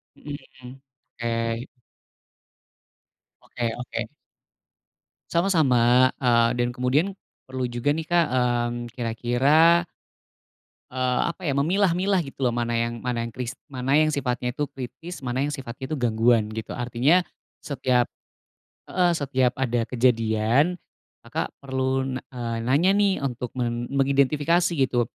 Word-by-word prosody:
Mhm, 145 -1 -7 0.3
mhm, 125 +2 -11 0.4
oke. 115 0 -1 1.8
Oke 120 -2 -3
oke. 125 - -4 1.2
Sama-sama, 130 -9 +4
eee, 120 -2 +3
dan 120 0 +1
kemudian, 135 +10 +1 0.3
perlu 130 -1 -3
juga 120 +4 0
nih 160 - -2
Kak, 175 -1 +4
mmm, 120 -1 0
kira-kira 130 +9 +3 1.1
eee, 125 -1 0
apa 170 - -8
ya, 140 - +1
memilah-milah 185 +6 +2
gitu 135 0 -11
loh - - -3
mana 120 0 -1
yang 115 0 -1
mana 125 -2 -1
yang 115 - -3
kris 125 +1 -5 0.2
mana 130 0 -2
yang 155 +1 +5
sifatnya 125 -4 -1
itu 145 +4 -2
kritis, 135 +7 -8
mana 130 +1 -1
yang 145 - -3
sifat 130 -4 -7
itu 155 - -5
gangguan 115 -4 +2
gitu. 110 0 -6
Artinya, 125 +8 +2 0.4
setiap 130 -3 0 0.8
heeh, 180 -1 +2
setiap 130 -5 +1
ada 120 -3 -1
kejadian, 115 +4 +2 0.5
maka - - -4
perlu 130 -1 -1
na - - -8
eee, 120 -2 -3
nanya 145 +10 +3
nih 200 -1 +3
untuk 125 -3 -4
men 120 -1 -2
mengidentifikasi 140 +5 +2
gitu, 130 -5 +1
130 Hz, 125 wpm, -24 LUFS, 120-145 Hz, 1.8 s, yang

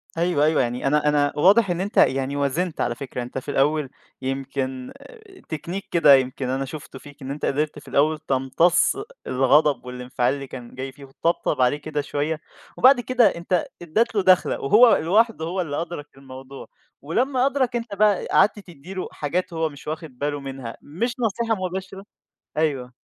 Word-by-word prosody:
أيوه، 165 -3 +2
أيوه، 155 -2 +3
يعني 125 +2 -2
أنا 150 +1 +2
أنا 145 -1 +2
واضح 195 +7 +5
إن 175 0 -1
أنت 200 +2 -5
يعني 135 +1 +3
وازنت 150 +5 -1
على 120 - 0
فكرة، 125 -1 -5
أنت 125 - -7
في 130 - -4
الأول 145 0 +1 0.3
يمكن 130 -1 -4 0.6
تكنيك 170 +5 -5
كده 150 -5 +7
يمكن 130 0 -1
أنا 135 +1 -1
شُفته 135 -1 -9
فيك، 145 -1 -15
إن 135 - -5
أنت 145 - -4
قدرت 150 +2 -1
في - - -19
الأول 155 +2 +2
تمتص 150 - +2 0.3
الغضب 135 +2 +3
والانفعال 125 0 -1
اللي 140 -1 -6
كان 125 -2 -10
جاي 130 +1 -5
فيه 140 +1 -13
وتطبطب 140 0 -1
عليه 125 +3 +3
كده 150 0 -3
شوية، 150 +2 -2 0.4
وبعد 260 0 +6
كده 245 -1 +3
أنت 170 +1 -1 0.2
أدّيت 215 +8 0
له 200 - +3
دخلة 185 -1 +4
وهو 225 - +6
لواحده 205 +1 +2
هو 180 +3 -2
اللي 145 -2 -3
أدرك 170 -3 -6
الموضوع. 135 0 -11 0.3
ولمّا 250 - +1
أدرك 270 -3 0
أنت 230 -3 -4
بقى 205 -1 +3
قعدت 210 0 +3
تدّي 175 -2 -12
له 185 - -4
حاجات 170 +5 -3
هو 160 -1 0
مش 145 0 -14
واخد 155 -4 -6
باله 145 0 -2
منها 135 -4 -7
مش 230 - -3
نصيحة 225 0 0
مباشرة. 190 +2 -6 0.5
أيوه. 135 -5 -1
150 Hz, 175 wpm, -23 LUFS, 135-185 Hz, 0.6 s, كده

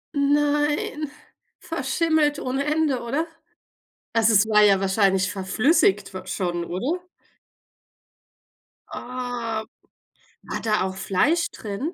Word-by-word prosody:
Nein, 295 +1 +1 0.5
verschimmelt 315 -3 0
ohne 270 +1 -2
Ende, 300 -4 +1
oder? 275 +8 -1 0.9
Also 225 -1 +4
es 205 0 +5
war 210 -1 +5
ja 200 -2 +5
wahrscheinlich 195 -1 +2
verflüssigt 200 - +2
wa 185 0 -7
schon, 175 -2 -2
oder? 255 - -3 1.9
Oh. 245 -3 -4 0.8
War - - -5
da 215 -1 +1
auch 190 0 -3
Fleisch 205 - +1
drin? 220 - -5
230 Hz, 100 wpm, -24 LUFS, 195-295 Hz, 1.9 s, es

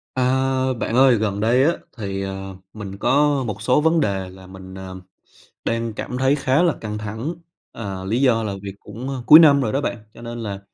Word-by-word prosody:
A, 130 - +1 0.5
bạn 115 -1 -3
ơi 130 -1 +6
gần 105 -2 -1
đây 120 +5 +3
á 160 - +4 0.3
thì, 100 -3 -4
ờ, 95 0 -6 0.2
mình 100 -2 -8
có 140 +4 +2
một 105 -1 -5
số 125 +6 +2
vấn 160 +2 +3
đề 95 -8 -1
là 95 0 -14
mình, 95 0 -11
ờ, 95 -1 -8 0.7
đang 115 -1 -1
cảm 125 - -5
thấy 130 +2 +3
khá 140 +3 +2
là 170 - +3
căng 105 -1 -4
thẳng. 110 +10 -5 0.4
Ờ, 95 -4 -6
lý 115 +6 0
do 120 -4 +3
là 105 -2 -3
việc 100 -1 -7
cũng, 115 +6 -8
a, 135 - -3
cuối 155 - +10
năm 145 -4 +6
rồi 115 -5 -1
đó 140 - +1
bạn, 120 - -2 0.2
cho - - -14
nên 120 0 -7
là, 100 -2 -5
115 Hz, 220 wpm, -21 LUFS, 100-130 Hz, 0.7 s, cuối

